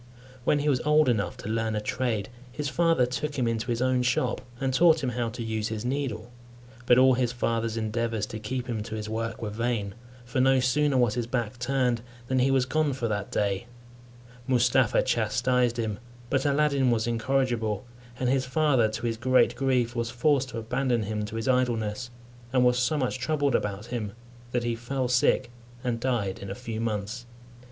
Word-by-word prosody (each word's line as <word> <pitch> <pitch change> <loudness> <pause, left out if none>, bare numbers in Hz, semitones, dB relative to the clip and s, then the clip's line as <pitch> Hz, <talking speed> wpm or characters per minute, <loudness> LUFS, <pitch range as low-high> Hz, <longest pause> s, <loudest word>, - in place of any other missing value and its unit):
When 150 - +3
he 145 +1 -1
was 135 -4 +2
old 150 -1 +4
enough 110 -5 0
to - - -8
learn 110 0 -1
a - - 0
trade, 120 -3 -2 0.2
his 145 +2 -3
father 165 -1 +3
took 145 +4 -3
him 125 -3 +1
into 115 +1 -1
his 120 0 0
own 130 -1 +2
shop, 125 - 0 0.2
and 135 -1 0
taught 160 +1 +5
him 125 - 0
how 120 -1 -1
to 115 +1 -6
use 110 -1 -2
his 110 0 -4
needle; 125 -4 -3 0.6
but 120 - +6
all 130 0 +6
his 125 -1 +1
father's 115 -2 -1
endeavours 115 -1 -1
to 110 +1 -7
keep 125 +4 -3
him 115 -4 -3
to 110 +1 -6
his 110 0 -4
work 115 +1 -3
were 105 - -3
vain, 110 -3 -2 0.3
for 125 +1 0
no 135 0 +4
sooner 135 +2 +2
was 120 -4 +3
his 120 -1 -2
back 120 -1 -2
turned, 125 -2 +1 0.3
than 130 0 +1
he 130 +2 +3
was 135 -2 +3
gone 150 +2 +1
for 125 -3 -2
that 105 -1 -3
day, 100 +2 -1 0.8
Mustapha 125 -1 +3
chastised 120 +1 +1
him, 110 -3 -2 0.3
but 135 +1 +2
Aladdin 140 -2 +2
was 115 -2 +1
incorrigible, 120 -1 0 0.3
and 130 - 0
his 130 +1 +2
father, 130 -5 +3
to 115 +2 -5
his 115 -1 -1
great 130 +2 +3
grief, 125 -3 +1
was 115 -1 -1
forced 135 +2 +1
to 115 - -6
abandon 120 +1 0
him 105 0 -2
to 105 +1 -7
his 115 +2 -3
idleness; 120 -2 0 0.4
and 125 -1 +3
was 125 0 +3
so 125 +5 +1
much 130 -2 -1
troubled 140 0 0
about 105 -1 -1
him, 105 -4 -3 0.4
that 120 -1 0
he 120 0 0
fell 125 +3 -2
sick 125 0 +2 0.3
and 120 -2 -1
died 115 -7 -1
in 100 - -7
a 95 - -4
few 115 -3 -5
months. 110 +2 -3
120 Hz, 195 wpm, -27 LUFS, 115-130 Hz, 0.8 s, but